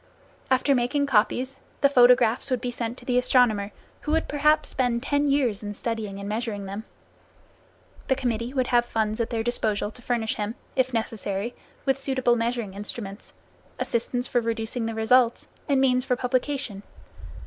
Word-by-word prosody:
After 260 +2 +3
making 270 +3 +1
copies, 255 +2 +1 0.2
the 280 - +7
photographs 245 -3 +5
would 255 -2 +1
be 245 - -3
sent 235 0 -4
to - - -14
the 250 -1 +2
astronomer 225 -5 +3 0.3
who 300 - -4
would 320 - +1
perhaps 300 +1 +2
spend 245 -2 0
ten 285 +1 +1
years 260 -7 +1
in 205 -1 -5
studying 220 -3 -4
and 200 - -6
measuring 215 -2 -3
them. 200 +3 -6 1.2
The 265 - +3
committee 240 -2 -2
would 260 -2 0
have 240 -1 +3
funds 220 -1 -1
at 230 - -1
their 225 -1 -1
disposal 215 -3 0
to 245 - -11
furnish 235 -2 -1
him, 210 +2 -3 0.2
if 260 0 +2
necessary, 220 -1 -2 0.3
with 270 -1 +1
suitable 260 -3 +2
measuring 230 -3 -2
instruments, 205 0 -6 0.4
assistants 245 +2 -1
for 245 - +1
reducing 225 0 -2
the 225 - -4
results, 235 +2 +3 0.2
and 275 -1 +3
means 255 -1 +3
for 250 -1 +1
publication. 250 -4 -2
240 Hz, 165 wpm, -25 LUFS, 220-260 Hz, 1.2 s, the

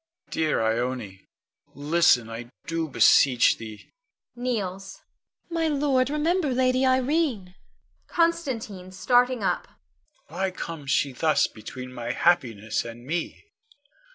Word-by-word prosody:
Dear 155 -7 0
Ione, 110 -4 -2 0.5
listen, 145 -4 +3
I 115 +1 -8 0.2
do 165 -1 -2
beseech 130 -2 +4
thee! 110 -2 -10 0.4
[Kneels.] 195 -6 -4 0.5
Ione. - - -6
My 330 -1 +1
lord, 275 -3 +1
remember 305 +1 0
Lady 255 0 +2
Irene. 260 - +1 0.5
Con. 335 -1 +3
[starting 235 - -1
up]. - - -1 0.6
Why 190 +4 -2
comes 165 -6 -7
she 140 0 +2
thus 155 +5 +2
between 125 +3 -9
my 120 -1 -4
happiness 115 -12 +1
and 120 +1 -10
me? 165 +4 -4
180 Hz, 110 wpm, -25 LUFS, -, 0.6 s, beseech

